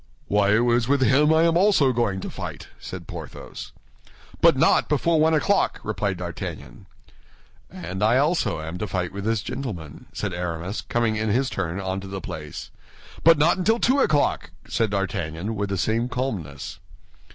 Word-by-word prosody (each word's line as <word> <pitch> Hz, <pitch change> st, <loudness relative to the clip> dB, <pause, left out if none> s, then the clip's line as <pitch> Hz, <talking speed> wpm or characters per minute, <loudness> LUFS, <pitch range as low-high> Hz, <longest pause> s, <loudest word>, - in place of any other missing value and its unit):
"Why, 100 Hz, -1 st, +2 dB
it 115 Hz, -, +3 dB
is 120 Hz, -1 st, +2 dB
with 140 Hz, 0 st, +3 dB
him 145 Hz, +4 st, +4 dB
I 160 Hz, +1 st, +4 dB
am 165 Hz, 0 st, +3 dB
also 175 Hz, -8 st, +4 dB
going 105 Hz, -6 st, 0 dB
to -, -, -5 dB
fight," -, -, -7 dB
said -, -, -8 dB
Porthos. -, -, -8 dB, 0.7 s
"But -, -, +6 dB
not -, -, +3 dB
before 155 Hz, +3 st, +2 dB
one 160 Hz, +1 st, +4 dB
o'clock," 200 Hz, +6 st, +1 dB
replied 100 Hz, -3 st, -2 dB
D'Artagnan. 85 Hz, -7 st, -7 dB, 0.8 s
"And 95 Hz, +2 st, -6 dB
I 110 Hz, +4 st, +4 dB
also 140 Hz, -, +1 dB
am 80 Hz, +3 st, -6 dB
to 105 Hz, -, -2 dB
fight 90 Hz, -2 st, -2 dB
with 100 Hz, 0 st, -5 dB
this 110 Hz, -2 st, 0 dB
gentleman," 90 Hz, -, -6 dB
said 100 Hz, -3 st, -3 dB
Aramis, 90 Hz, +3 st, -3 dB
coming 115 Hz, -2 st, 0 dB
in 110 Hz, 0 st, -1 dB
his 130 Hz, +5 st, +1 dB
turn 90 Hz, -1 st, -3 dB
onto 95 Hz, 0 st, -3 dB
the 95 Hz, 0 st, -5 dB
place. 75 Hz, -3 st, -7 dB, 0.5 s
"But 165 Hz, -1 st, +7 dB
not 165 Hz, +5 st, +3 dB
until 220 Hz, +5 st, +3 dB
two 260 Hz, +4 st, +2 dB
o'clock," 150 Hz, -, +2 dB, 0.2 s
said 115 Hz, -, 0 dB
D'Artagnan, 95 Hz, 0 st, -2 dB
with 100 Hz, -1 st, -2 dB
the 100 Hz, -, -1 dB
same 115 Hz, +6 st, 0 dB
calmness. 105 Hz, -, -4 dB
110 Hz, 170 wpm, -24 LUFS, 95-140 Hz, 0.8 s, But